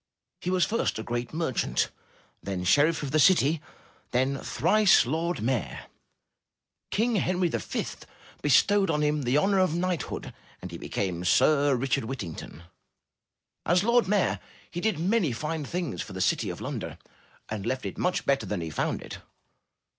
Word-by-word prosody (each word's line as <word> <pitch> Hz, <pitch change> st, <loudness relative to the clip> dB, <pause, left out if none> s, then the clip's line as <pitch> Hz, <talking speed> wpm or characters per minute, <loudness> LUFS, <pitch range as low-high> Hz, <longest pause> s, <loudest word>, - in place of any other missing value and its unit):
He 180 Hz, -, -3 dB
was 185 Hz, -1 st, +3 dB
first 230 Hz, +2 st, -1 dB
a 110 Hz, -, -4 dB
great 120 Hz, +1 st, -3 dB
merchant, 155 Hz, -7 st, 0 dB, 0.5 s
then 95 Hz, -2 st, -4 dB
sheriff 150 Hz, -, +3 dB
of 140 Hz, -, -3 dB
the 155 Hz, -, +3 dB
city, 160 Hz, -2 st, +4 dB, 0.5 s
and 130 Hz, +2 st, 0 dB
thrice 215 Hz, -, +4 dB
lord 165 Hz, +3 st, -1 dB
mayor; 120 Hz, -3 st, -2 dB, 1.0 s
King 225 Hz, +3 st, +1 dB
Henry 180 Hz, -1 st, +1 dB
V -, -, -2 dB, 0.6 s
bestowed 195 Hz, -, +4 dB
upon 150 Hz, -1 st, +1 dB
him 150 Hz, 0 st, +1 dB
the 130 Hz, +1 st, +1 dB
honor 195 Hz, +5 st, +3 dB
of 185 Hz, -4 st, +2 dB
knighthood 175 Hz, -3 st, -2 dB, 0.3 s
and 90 Hz, -, -8 dB
he 85 Hz, -, -7 dB
became 90 Hz, -3 st, -3 dB
Sir 140 Hz, -, +4 dB
Richard 130 Hz, 0 st, 0 dB
Whittington. 85 Hz, -, -7 dB, 1.0 s
As 175 Hz, +2 st, +3 dB
Lord 235 Hz, -2 st, +3 dB
Mayor, 200 Hz, -1 st, +1 dB, 0.3 s
he 175 Hz, -, -4 dB
did 220 Hz, -5 st, +1 dB
many 180 Hz, -, +1 dB
fine 155 Hz, +6 st, -3 dB
things 170 Hz, -, -3 dB
for -, -, -7 dB
the -, -, -6 dB
city -, -, +1 dB
of -, -, -6 dB
London -, -, -5 dB, 0.5 s
and 105 Hz, 0 st, -4 dB
left 130 Hz, +1 st, -2 dB
it -, -, -5 dB
much 180 Hz, 0 st, 0 dB
better 140 Hz, -1 st, +1 dB
than 100 Hz, -4 st, -2 dB
he 80 Hz, -1 st, -5 dB
found -, -, -2 dB
it. -, -, -8 dB
150 Hz, 160 wpm, -27 LUFS, 125-180 Hz, 1.0 s, city